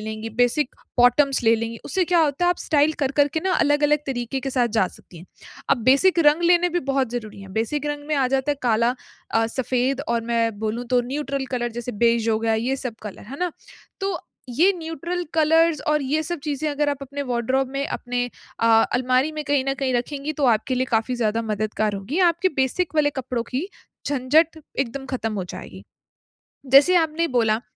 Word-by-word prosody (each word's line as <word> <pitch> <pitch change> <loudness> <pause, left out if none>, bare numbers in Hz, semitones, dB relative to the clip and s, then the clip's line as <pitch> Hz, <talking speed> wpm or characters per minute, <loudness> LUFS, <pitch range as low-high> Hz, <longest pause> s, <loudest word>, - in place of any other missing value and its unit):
लेंगी, 220 +1 -5
basic 245 +5 +1 0.2
bottoms 265 +3 +4
ले 225 0 +5
लेंगी, 230 +1 -4
उससे 370 +6 0
क्या 350 0 +2
होता 300 +2 +1
है 350 - +4
आप 355 - 0
स्टाइल 295 0 +2
कर-कर 285 +2 +2
के - - +2
ना 380 - +1
अलग-अलग 295 0 +3
तरीके 255 0 -3
के 270 +1 -4
साथ 250 -2 +1
जा 190 - +4
सकती 175 - -14
हैं। 170 - -13 0.4
अब 275 - +4
बेसिक 280 +9 +4
रंग 300 +3 +5
लेने 350 +1 +4
भी 350 0 -1
बहुत 270 -3 0
ज़रूरी 220 -4 -6
हैं, 195 -1 -11
बेसिक 270 +8 -2
रंग 290 0 -4
में 305 - +1
आ 270 -2 +2
जाता 270 +2 0
है - - -7
काला 235 +1 +2 0.4
अ, 225 0 +3
सफेद 255 +3 -1
और 235 0 0
मैं 230 -2 0
बोलूँ 220 +3 -3
तो 250 -1 +4
न्यूट्रल 275 -2 -3
कलर 240 -2 -2
जैसे 240 +1 -5
बेज 230 -1 +2
हो 220 -1 +2
गया, 225 0 +1
ये 245 +5 -1
सब 250 -4 -5
कलर 210 -2 -8
है 280 - -7
ना? 360 -2 -1 0.5
तो 390 -3 -1 0.3
ये 340 +11 +4
न्यूट्रल 335 +2 -4
कलर्स 325 0 +3
और 300 -1 +2
ये 295 +4 0
सब 345 +2 -3
चीज़ें 300 0 -2
अगर 290 0 0
आप 285 -1 -1
अपने 280 +1 -5
वार्डरोब 255 +1 0
में 275 +1 -2
अपने 245 0 -2 0.4
अ, 230 - +2 0.3
अलमारी 255 +3 +2
में 305 0 -4
कहीं 285 -2 +1
न 270 - +1
कहीं 265 -2 0
रखेंगी 280 +4 -2
तो 285 -2 +1
आपके 225 +4 -1
लिए 255 +1 0
काफ़ी 225 +2 +1
ज़्यादा 225 -1 0
मददगार 215 -1 -1
होंगी, 200 - -4
आपके 355 0 +3
बेसिक 280 +6 0
वाले 295 -1 +3
कपड़ों 255 -3 -3
की 285 +10 -2 0.4
झंझट 290 +4 +2 0.2
एकदम 270 +1 -2
खत्म 225 -3 -2
हो 190 -3 -3
जाएगी। - - -9 0.9
जैसे 290 +7 +7
आपने 325 0 +1
बोला, 225 -4 +1
265 Hz, 205 wpm, -23 LUFS, 235-300 Hz, 0.9 s, जैसे